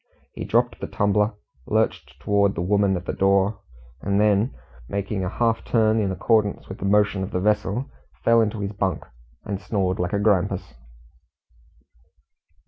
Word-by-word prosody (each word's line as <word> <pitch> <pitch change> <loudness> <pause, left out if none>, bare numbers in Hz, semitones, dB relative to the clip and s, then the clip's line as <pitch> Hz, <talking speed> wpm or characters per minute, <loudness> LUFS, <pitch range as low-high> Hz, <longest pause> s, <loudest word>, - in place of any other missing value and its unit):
He - - -6
dropped - - +1
the - - -3
tumbler, 105 +1 +1 0.3
lurched - - -1
towards 100 -1 +2
the 85 - -2
woman 100 0 +2
at 90 - -8
the - - -3
door, 100 +1 +2 0.4
and 100 0 0
then 105 +3 +2 0.3
making 100 -1 -2
a 90 - -1
half 115 +1 0
turn 110 -1 +2
in 100 -3 0
accordance 105 +2 +1
with 95 - -8
the - - -4
motion 105 -1 +2
of 95 - -3
the 90 - -2
vessel, 105 +4 0 0.4
fell 115 0 +5
into 110 -1 -1
his 100 0 -3
bunk, 95 -4 -2 0.4
and 100 -1 -4
snored 95 -2 -1
like 90 +1 -1
a - - +2
grampus. 100 -2 +1
100 Hz, 160 wpm, -23 LUFS, 95-105 Hz, 0.4 s, fell